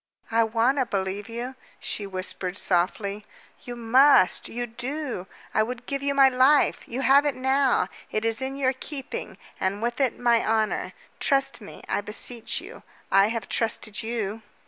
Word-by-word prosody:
"I 230 0 +4
want 230 +5 +2
to 255 - +1
believe 195 0 -3
you," 240 +3 -5 0.3
she 205 - -3
whispered 185 0 -4
softly. 200 +3 0 0.4
"You 245 - -7
must 240 -2 +4
you 240 +1 -3
do! 245 -3 -4 0.3
I - - +3
would 235 +2 -3
give 275 0 -3
you 280 0 0
my 275 -1 +7
life. 265 +3 +4
You 250 +3 -3
have 275 +2 +6
it 290 -2 0
now. 265 0 +2 0.2
It 215 +1 -2
is 225 +1 0
in 265 +1 -3
your 265 -1 +1
keeping, 270 +1 -6 0.2
and 190 +2 -1
with 240 +3 -2
it 260 -3 +1
my 235 -1 +3
honor. 220 -1 0 0.3
Trust 275 -3 +1
me, 205 - -11
I - - 0
beseech 220 +3 -3
you. - - -11 0.3
I 195 +1 +6
have 225 -2 -3
trusted 215 -3 -1
you." 225 -2 -3
235 Hz, 170 wpm, -25 LUFS, 210-265 Hz, 0.4 s, my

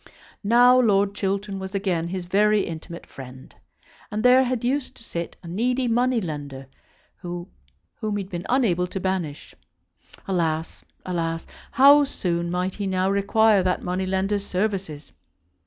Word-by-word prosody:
Now 245 +4 +6
Lord 200 -4 +3
Chiltern 195 0 -2
was 190 +1 -6
again 180 -4 -1
his 185 0 -4
very 210 +3 +3
intimate 170 +1 -7
friend. 130 -1 -12 0.6
And 210 +1 -3
there 255 +1 +7
had 245 -2 -2
used 260 +2 -1
to - - -13
sit 170 -6 -5
a - - -9
needy 245 +8 0
money 245 +1 +2
lender 145 -7 -6 0.5
whom 175 0 -6 0.6
he 205 -2 -2
had 190 - -14
been 175 0 -5
unable 195 -9 +2
to 190 - -5
banish. 185 -6 -3 0.7
Alas! 165 -4 -2 0.2
alas! 165 -2 -2 0.3
how 285 +2 +7
soon 170 -10 -2
might 180 +1 -1
he 200 -2 -4
now 190 0 +1
require 200 +1 +3
that 180 0 -1
money 185 +1 -2
lender's 195 +2 0
services! 185 -7 -3
190 Hz, 145 wpm, -24 LUFS, 175-215 Hz, 0.7 s, there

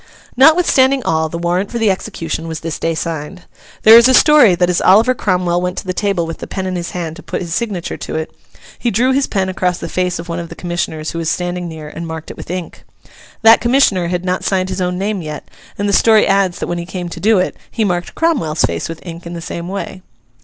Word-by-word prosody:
Notwithstanding 275 -2 +4
all, 160 -3 0
the 170 - -5
warrant 175 +3 -1
for 240 - -3
the 225 -3 +3
execution 165 -3 -4
was 160 -1 -5
this 165 -2 -4
day 165 0 -1
signed. 165 +2 -5 0.4
There 225 +2 +10
is 235 - +5
a 260 - +5
story 290 - +6
that 180 0 +2
as 180 -1 0
Oliver 220 +7 +5
Cromwell 180 -6 0
went 180 0 -3
to - - -5
the 185 - -2
table 195 -3 0
with 165 - -7
the - - -7
pen 190 -1 -4
in 185 -1 -3
his 175 -1 -4
hand 165 -2 -5
to - - -10
put - - -4
his 170 -2 -5
signature 200 -5 -3
to - - -6
it, 160 0 -4 0.4
he 240 - 0
drew 240 +5 +2
his 270 +1 +1
pen 190 -2 -1
across 180 -1 -1
the - - -6
face 180 -1 -1
of 170 - -8
one 170 0 -3
of 170 -1 -6
the - - -9
commissioners, 175 -3 -3
who 170 - -5
was 165 -1 -1
standing 175 0 -2
near, 160 -2 -8
and 165 +2 -7
marked 160 -1 -7
it - - -12
with - - -10
ink. 180 -1 -6 0.6
That 225 +1 +7
commissioner 235 -8 +3
had 180 +1 -2
not 180 0 -1
signed 185 -1 0
his 185 0 -3
own 180 0 -1
name 200 0 -2
yet, 150 -2 -7 0.3
and 205 - -1
the 200 - 0
story 220 0 +5
adds 195 -2 +1
that - - -4
when 175 0 -3
he 170 - -6
came 180 -1 -5
to 170 - -8
do 215 +4 +3
it 185 - 0
he 220 - -1
marked 175 -2 -2
Cromwell's 265 - 0
face 85 - -3
with 165 +1 -8
ink 170 0 -8
in 170 - -7
the 170 - -5
same 170 +1 -6
way. 190 0 -5
180 Hz, 255 wpm, -16 LUFS, 170-205 Hz, 0.6 s, There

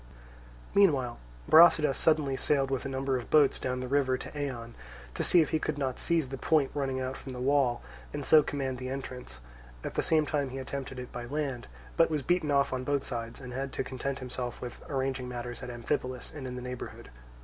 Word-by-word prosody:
Meanwhile 140 -12 +3 0.3
Brasidas 155 -3 +7
suddenly 155 -4 +2
sailed 135 0 +1
with 135 -1 -1
a - - -2
number 135 0 0
of 120 - -9
boats 150 -3 +5
down 125 0 -2
the 130 - -4
river 130 -1 +2
to - - -8
Eion 125 -5 -4 0.4
to - - -2
see 175 -2 +6
if - - -6
he 160 - +2
could 155 -1 -2
not 135 -3 -2
seize 165 -6 +1
the 135 -1 -6
point 150 -4 +2
running 135 -2 -1
out 130 +1 -3
from 130 - -8
the 125 - -6
wall, 130 -2 +2 0.3
and 145 -2 -4
so 155 - +7
command 135 -3 -3
the 130 0 -4
entrance; 130 - -6 0.4
at - - -4
the - - +1
same 155 -1 +3
time 145 -2 -1
he 130 - -6
attempted 130 0 -5
it 125 0 -7
by 120 -1 -6
land, 140 -2 -3 0.3
but 165 - +5
was 150 -3 -1
beaten 175 -2 +1
off 140 -1 +3
on 130 0 -2
both 140 +1 0
sides 115 -2 -5
and 125 -2 -8
had 135 +1 -3
to - - -1
content 130 +1 -3
himself 125 -1 -4
with 120 -1 -7
arranging 130 -2 -2
matters 120 0 -5
at 125 - -6
Amphipolis 125 +1 -3
and 140 -4 -6
in 125 - -5
the 125 - -6
neighbourhood. 125 - -7
135 Hz, 215 wpm, -30 LUFS, 125-145 Hz, 0.4 s, Brasidas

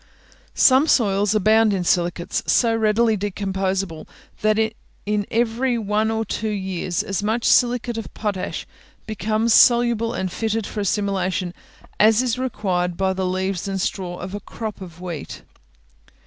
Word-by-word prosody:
Some 265 +4 +5
soils 205 -5 +2
abound 215 +1 +4
in 185 -2 -1
silicates 175 0 0
so 230 -2 +3
readily 220 +1 +2
decomposable, 195 -3 -3 0.3
that 215 0 +2 0.5
in 205 -1 -1
every 240 +2 0
one 215 0 0
or 225 0 -1
two 220 0 -3
years, 190 -4 -2
as 195 0 -2
much 220 +3 -1
silicate 240 -1 +2
of 225 - -8
potash 205 -4 -3 0.4
becomes 215 +2 0
soluble 235 -1 +4
and 185 -4 -2
fitted 220 +1 -2
for 215 - -6
assimilation 190 -3 -1 0.5
as 220 +3 +5
is 250 -1 -1
required 185 -8 -1
by 190 0 +1
the 190 0 -2
leaves 185 0 -2
and 195 -1 -2
straw 180 -1 -3
of 180 +2 -7
a 205 - -4
crop 215 0 -7
of 175 -2 -10
wheat. 170 -5 -7
210 Hz, 145 wpm, -22 LUFS, 190-225 Hz, 0.5 s, Some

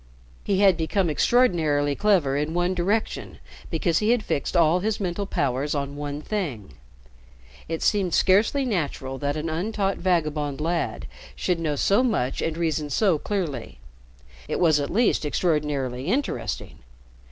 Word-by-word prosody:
He 195 -1 +1
had 195 -4 +5
become 170 +1 0
extraordinarily 155 - +2
clever 175 -7 +2
in 150 +3 -1
one 175 +1 +1
direction 175 - -1 0.3
because 165 0 +1
he 215 - 0
had 240 -2 +3
fixed 140 - -1
all 170 +1 +4
his 215 +3 -1
mental 195 +1 -2
powers 140 0 -1
on 140 0 -3
one 145 0 -5
thing. 140 - -4 0.9
It 165 0 -3
seemed 195 -5 +2
scarcely 215 +9 +3
natural 140 - -2
that 145 +1 -1
an 155 +2 -3
untaught 195 +4 -1
vagabond 155 -5 0
lad 165 +2 -2 0.3
should 180 -2 -1
know 155 -3 -1
so 200 - +3
much 200 - 0
and 165 0 -2
reason 160 -3 -1
so 175 +2 +2
clearly. 165 - -3 0.7
It - - -2
was 160 -4 +4
at 140 - -2
least 225 -2 +2
extraordinarily 150 -5 -1
interesting. 265 +9 -2
165 Hz, 145 wpm, -24 LUFS, 145-195 Hz, 0.9 s, had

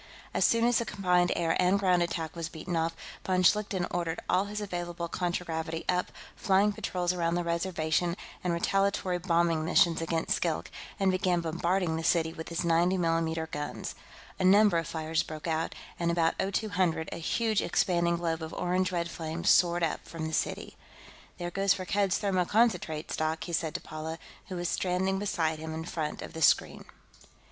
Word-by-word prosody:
As - - +2
soon 230 0 +4
as 240 0 +4
the 235 - -2
combined 180 -4 +2
air 165 -1 +1
and 180 +2 +4
ground 185 -3 +3
attack 165 -2 -2
was 165 -1 -4
beaten 170 +2 -5
off, 165 0 0 0.3
von 185 -1 +1
Schlichten 200 -2 +2
ordered 170 -2 -2
all 185 +2 +2
his 210 +1 -5
available 175 -4 -4
contragravity 165 -2 -3
up, 180 0 0 0.2
flying 200 +1 +3
patrols 180 -4 -1
around 170 -1 0
the 175 - 0
Reservation 170 0 0 0.3
and 180 - 0
retaliatory 185 +1 +1
bombing 170 -2 +2
missions 170 0 +3
against 165 0 0
Skilk, - - -1 0.3
and 195 -1 +3
began 185 -1 +1
bombarding 170 +1 0
the 165 - -4
city 160 -1 +2
with 160 -1 -7
his 170 +1 -2
90 170 +3 +3
mm 165 -2 0
guns. 145 0 -4 0.5
A - - 0
number 200 -1 +6
of 165 - -4
fires 160 -1 -1
broke 155 -1 -7
out, 160 -1 -1 0.2
and 170 -1 +1
at - - +2 0.2
about 195 - -1
0200 185 -7 0
a - - -4
huge 215 +5 0
expanding 170 -1 +1
globe 165 -1 -2
of 160 0 -6
orange 185 +1 0
red 170 -1 -1
flame 165 -1 -5
soared 175 -1 +4
up 165 - -1
from 165 -1 -5
the 160 - -4
city. - - -2 0.6
"There 175 0 -4
goes 195 +1 +2
Firkked's 195 0 0
thermoconcentrate 185 -4 +1
stock," 160 +1 -1
he 170 - -6
said 160 -1 -1
to - - -2
Paula, 155 +1 -6 0.3
who 185 - -6
was 175 0 -2
standing 190 +2 0
beside 165 -6 -1
him 160 0 -5
in 160 0 -5
front 155 -3 -4
of - - -9
the 160 - -6
screen. - - +3
175 Hz, 180 wpm, -29 LUFS, 165-185 Hz, 0.6 s, number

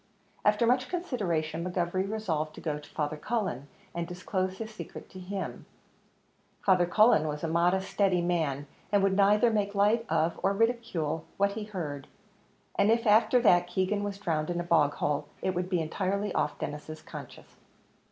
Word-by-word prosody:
After 210 +2 +3
much 250 +2 +2
consideration, 175 - -2
McGovery 180 +1 -1
resolved 160 -8 -2
to - - -9
go 150 -2 -2
to 150 - -14
Father 150 0 -2
Cullen, 170 - -2 0.3
and 170 -1 -3
disclose 185 +1 -2
his 220 0 -6
secret - - -9
to 185 - -9
him; 190 +1 -5 1.0
Father 180 -3 +4
Cullen 175 -5 +5
was 150 +1 -4
a - - 0
modest, 175 +4 +1
steady 195 -3 +2
man, 155 -5 0 0.2
who 205 - +3
would 195 -1 +2
neither 210 +4 +4
make 205 -2 0
light 210 +3 +3
of, 165 +1 +1
or 195 - +2
ridicule 200 -9 0
what 200 0 +3
he 210 +1 -5
heard; 155 -9 -5 0.7
and 200 +1 +3
if 230 +1 +3
after 220 +4 +5
that 175 -6 +5
Keegan 190 +3 0
was 200 -1 -3
drowned 160 -5 -1
in 175 0 -1
a - - -1
bog 155 -4 +3
hole, 145 -1 -1 0.2
it 190 - +1
would 180 0 -2
be 180 -2 +1
entirely 195 +5 -1
off 150 - 0
Denis's 150 +2 -6
conscience. - - -11
185 Hz, 170 wpm, -29 LUFS, 160-210 Hz, 1.0 s, Cullen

